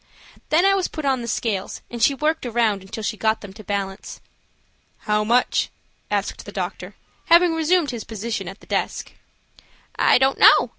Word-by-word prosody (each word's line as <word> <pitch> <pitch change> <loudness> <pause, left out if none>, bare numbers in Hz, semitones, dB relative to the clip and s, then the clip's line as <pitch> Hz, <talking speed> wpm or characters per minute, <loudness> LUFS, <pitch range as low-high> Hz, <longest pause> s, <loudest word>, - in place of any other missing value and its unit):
Then 330 +4 +4
I 390 - +5
was 385 -2 +1
put 310 -2 -6
on 265 -2 +1
the 235 - -6
scales, 215 -4 -2
and 240 -1 -6
she 275 +5 +4
worked 310 +3 0
around 225 -4 +1
until 195 +3 -8
she 215 +1 -2
got 220 +1 0
them 200 -2 -10
to 215 +1 -12
balance. 195 -1 -4 0.8
"How 210 0 +1
much?" 240 +3 +2 0.4
asked - - -2
the - - -10
doctor, - - -5 0.3
having 340 0 +5
resumed 325 -1 +2
his 235 -3 -5
position 225 +1 -5
at - - -9
the - - -16
desk. - - -2 0.9
"I - - +5
don't 265 +1 +2
know. - - +7
235 Hz, 180 wpm, -22 LUFS, 210-305 Hz, 0.9 s, know